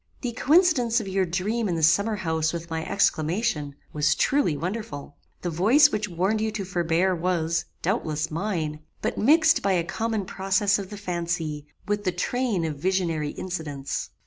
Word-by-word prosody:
"The 245 - -2
coincidence 270 -4 +3
of 215 - -6
your 190 0 +1
dream 205 +5 -1
in 175 - 0
the 165 - -2
summer 200 +7 +4
house 160 -4 -1
with 170 0 -6
my 160 0 -2
exclamation, 165 -4 0 0.2
was 150 0 +2
truly 270 - +2
wonderful. 170 -4 -5 0.3
The 175 - -1
voice 240 - +5
which 210 -1 -2
warned 190 +5 0
you 220 - 0
to 205 -3 -3
forbear 180 +1 +1
was, 170 -1 0 0.2
doubtless, 160 -5 -1
mine; 160 -4 -2 0.2
but - - -1
mixed 320 +7 +5
by 195 -1 +2
a 175 -2 +2
common 220 +3 -2
process 195 +2 +1
of 195 -2 -6
the 210 - -7
fancy, 170 -5 -3 0.2
with 205 0 -1
the 185 - +1
train 205 0 -1
of 155 -3 -3
visionary 170 -4 0
incidents. 150 -6 -4
185 Hz, 170 wpm, -25 LUFS, 160-215 Hz, 0.3 s, voice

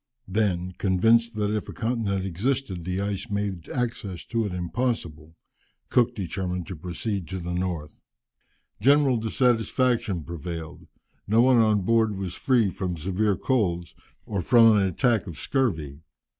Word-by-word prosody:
Then, 90 -3 0
convinced 115 +5 +3
that 105 -1 0
if 105 - -4
a - - -6
continent 110 -5 -1
existed 95 0 -2
the 90 +1 -2
ice 100 +3 -3
made 100 -4 -3
access 115 -7 -3
to 115 -2 -1
it - - -5
impossible, 85 -4 -3 0.5
Cook 120 -2 +2
determined 90 -2 -3
to 95 - -5
proceed 90 +3 -4
to 95 - -4
the 90 -1 -4
North. 90 -4 -4 0.8
General 140 -2 +4
dissatisfaction 115 - +1
prevailed; 85 0 -7 0.4
no 110 +3 +4
one 130 -1 +5
on 110 -3 +4
board 110 0 +2
was 95 -2 -4
free 120 -6 +2
from 90 -1 -3
severe 95 +5 0
colds, 90 - 0 0.3
or 100 -3 -2
from 115 +3 +6
an 105 - +4
attack 110 +4 +1
of 85 - -7
scurvy. 80 - -1
100 Hz, 145 wpm, -25 LUFS, 90-115 Hz, 0.8 s, from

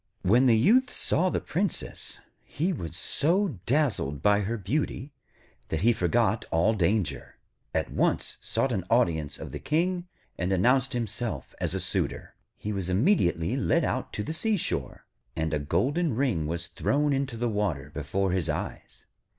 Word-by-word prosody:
When 120 +8 +5
the 115 -2 +5
Youth 245 - +4
saw 185 +3 +2
the - - 0
Princess, 190 +5 -3 0.2
he 175 +5 -1
was 85 - -6
so 165 - 0
dazzled 115 - +1
by 105 0 +5
her 105 +3 -2
beauty 130 - -2 0.5
that 80 - -2
he 120 +4 +5
forgot 90 -7 +1
all 85 +7 +3
danger, 100 0 0 0.4
at - - -1
once - - 0
sought 120 +4 0
an 100 -6 -1
audience 85 -11 +1
of - - -8
the - - -5
King, 175 +4 0 0.3
and 90 +1 0
announced 125 +8 +3
himself 110 - -3
as - - -1
a - - -1
suitor. - - -2 0.2
He 105 - -4
was 95 -3 -3
immediately 90 - +2
led - - +2
out - - -2
to 105 - -2
the 155 - -4
seashore, 210 +2 -1 0.3
and 80 -1 -1
a 75 - +1
golden 140 - 0
ring 115 - 0
was 85 +1 -3
thrown 145 +10 0
into 135 -3 -1
the 120 +1 0
water 95 -10 -1
before 90 +6 -1
his 90 -3 0
eyes. 75 - -5
110 Hz, 160 wpm, -27 LUFS, 85-140 Hz, 0.5 s, When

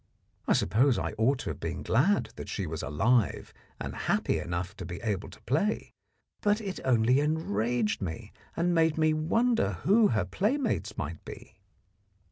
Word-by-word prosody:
I - - +4
suppose 120 - +3
I - - -2
ought 130 +5 +3
to - - -3
have 75 - -8
been 85 +2 -4
glad 180 - +2
that - - -8
she 100 - -3
was 80 -1 -4
alive 115 +10 +1 0.3
and - - -5
happy - - 0
enough 85 +3 -4
to 95 - -6
be 85 0 -6
able 105 -4 -2
to - - -14
play, 165 - 0 0.5
but 205 +1 +2
it 200 -4 -5
only 125 +1 +3
enraged 120 -8 0
me 80 -4 -5 0.2
and 175 +1 +2
made 160 -2 +3
me 155 -1 +3
wonder 170 - +1
who 210 +3 +5
her 105 -5 0
playmates 225 - -1
might 80 +1 -5
be. - - -11
120 Hz, 165 wpm, -29 LUFS, -, 0.5 s, who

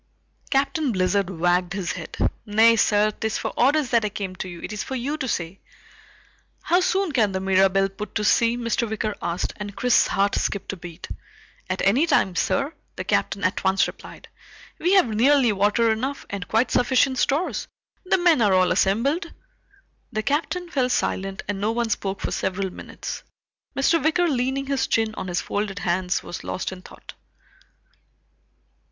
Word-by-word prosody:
Captain 280 +1 +1
Blizzard 190 0 +1
wagged 180 +1 +1
his 195 -3 -2
head. - - -7 0.3
"Nay 220 +2 +5
sir, 210 -1 +3
'tis 220 +1 -3
for - - -3
orders 280 +1 +2
that 235 -2 +3
I 210 - 0
came 200 -3 -5
to 185 - -5
you. 175 -1 -9
It - - -5
is 210 - -3
for 265 - -5
you 265 +4 -2
to 265 -4 -3
say." 175 -4 -3 1.0
"How 355 - +3
soon 375 -1 +1
can 220 -7 +2
the 190 - -1
Mirabelle 195 0 +3
put 195 +1 -8
to 210 - 0
sea?" 230 +2 +3
Mr. 235 0 -1
Wicker 215 0 -2
asked, 170 +1 -2
and 205 -1 -7
Chris's 250 0 +3
heart 200 +1 +1
skipped 200 -1 -2
a - - -5
beat. 175 -1 -10 0.6
"At - - -2
any 250 +12 +3
time, 195 - +2
sir," 280 - 0 0.2
the - - -4
Captain 200 - 0
at 185 - 0
once 190 +1 +3
replied. - - -10 0.5
"We 355 +4 +2
have 380 -10 +5
nearly 245 +3 +4
water 210 +3 +2
enough, 265 +6 -3
and 200 -3 -5
quite 225 +3 +1
sufficient 260 +1 +2
stores. 300 +7 0 0.4
The 370 - +2
men 345 -7 +4
are 200 -3 +4
all 185 -1 +3
assembled." 245 - +1 0.8
The 215 - -2
Captain 335 - -1
fell 255 -5 +1
silent 195 -5 -1
and 200 -1 -3
no 215 +2 +1
one 235 -1 -1
spoke 195 -1 -2
for - - -2
several 190 0 -2
minutes. - - -7 0.5
Mr. 310 +4 +2
Wicker 335 +3 +2
leaning 265 -1 0
his 275 -1 0
chin 225 -1 +1
on 185 - -6
his 175 -1 -1
folded 205 -1 -3
hands 180 0 -1
was - - -7
lost 185 - -3
in 185 -1 -9
thought. - - -13
215 Hz, 175 wpm, -23 LUFS, 195-265 Hz, 1.0 s, Nay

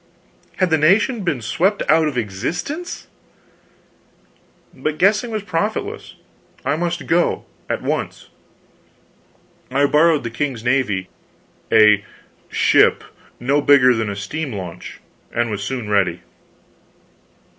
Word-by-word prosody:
Had 185 -3 +1
the 160 - +3
nation 205 - +3
been 145 -10 -2
swept 180 - +1
out 160 0 +4
of 140 -4 -3
existence? 160 - -4 1.7
But 155 0 -3
guessing 210 +5 +2
was 215 -2 -3
profitless. 215 - -3 0.5
I - - +1
must 175 +1 -3
go 175 +1 +1 0.2
at - - -2
once. - - -3 1.4
I 140 +3 +2
borrowed 155 +1 +3
the 115 - -4
king's 125 -2 -3
navy 120 -7 0 0.6
a 105 -2 +6 0.5
"ship" - - +3 0.4
no 140 +4 +1
bigger 135 -3 +6
than 110 -2 -2
a 100 - -4
steam 135 +9 -4
launch 90 -3 -8 0.3
and 120 -1 -1
was 105 -1 -3
soon 120 +1 -4
ready. 95 -4 +1
140 Hz, 115 wpm, -20 LUFS, 110-175 Hz, 1.7 s, a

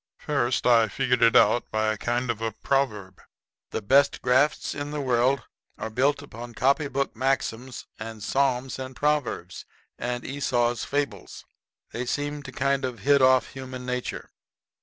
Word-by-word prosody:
First, 135 -4 0
I 115 -2 +5
figured 125 +2 0
it 115 -1 +5
out 120 - +4
by 110 0 +1
a - - -4
kind 120 +1 0
of 115 -1 -7
a 115 0 -1
proverb. 105 -9 -1 0.5
The 110 - -4
best 135 +7 +3
grafts 130 +4 +2
in 145 0 -5
the 150 0 -4
world 130 0 +2 0.3
are 110 - -5
built 140 +5 +1
up 140 - -15
on 120 +1 -8
copy 140 +3 +2
book 140 0 -2
maxims 130 -1 -2
and 110 -1 -7
psalms 130 +1 0
and 130 0 -6
proverbs 145 -11 -1 0.4
and 120 0 -3
Esau's 120 -4 0
fables. 145 0 -3 0.5
They 120 +1 -4
seem 145 +2 -2
to 135 - -9
kind 140 +2 0
of 125 -2 -4
hit 140 0 +4
off 130 0 +4
human 130 -1 -8
nature. 125 0 -4
130 Hz, 160 wpm, -26 LUFS, 120-140 Hz, 0.5 s, I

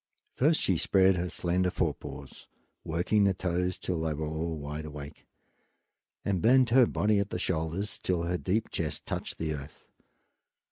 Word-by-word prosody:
First 155 +4 +3
she 95 - +2
spread 95 -1 +4
her 90 0 -2
slender 90 +3 0
fore - - 0
paws, 70 -1 -10 0.4
working 90 +6 +1
the 95 -1 +2
toes 90 0 -1
till 90 -3 -2
they 80 -1 -1
were 80 +1 -3
all 80 +1 -3
wide 75 +1 -5
awake, 75 0 -9 1.0
and 95 -4 0
bent 125 +1 +5
her 125 -1 +6
body 105 0 +2
at 100 0 -1
the - - -3
shoulders 85 +3 -2
till 90 -2 0
her 90 +1 -1
deep 105 +5 -1
chest - - -3
touched - - -4
the 80 -1 -2
earth. 70 0 -9
90 Hz, 170 wpm, -29 LUFS, 80-100 Hz, 1.0 s, her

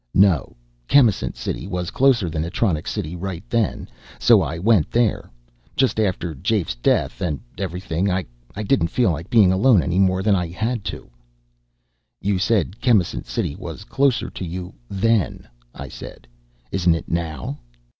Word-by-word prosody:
"No. 95 -6 +3 0.3
Chemisant 120 -8 +3
City - - -4
was 90 -3 -3
closer 125 -8 +3
than 80 -1 -2
Atronics 85 -1 -1
City 80 +3 -4
right 95 +2 -6
then, 115 -4 0 0.3
so 120 -4 +5
I 80 -1 -3
went 95 -2 +3
there. 115 -3 +1 0.5
Just 130 -4 +2
after 90 -5 0
Jafe's 90 - -1
death, - - 0
and 75 -5 -1 0.2
everything 90 0 -2
I 90 -1 0 0.3
didn't 105 -2 +1
feel 120 +1 +2
like 80 +1 -5
being 105 -6 +5
alone 100 0 +4
any 90 +1 0
more 95 -1 +2
than 105 -1 +4
I 90 -2 -1
had 110 +6 -2
to." 95 - -6 1.1
"You 100 -1 0
said 100 0 0
Chemisant 100 - +2
City 70 - -2
was 85 +1 -8
closer 135 +2 +1
to - - -6
you 90 +1 -6 0.2
then," 105 0 0 0.3
I - - -7
said. - - -10 0.4
"Isn't 90 -3 +2
it 85 - -6
now?" 80 -4 -3
95 Hz, 155 wpm, -22 LUFS, 85-110 Hz, 1.1 s, so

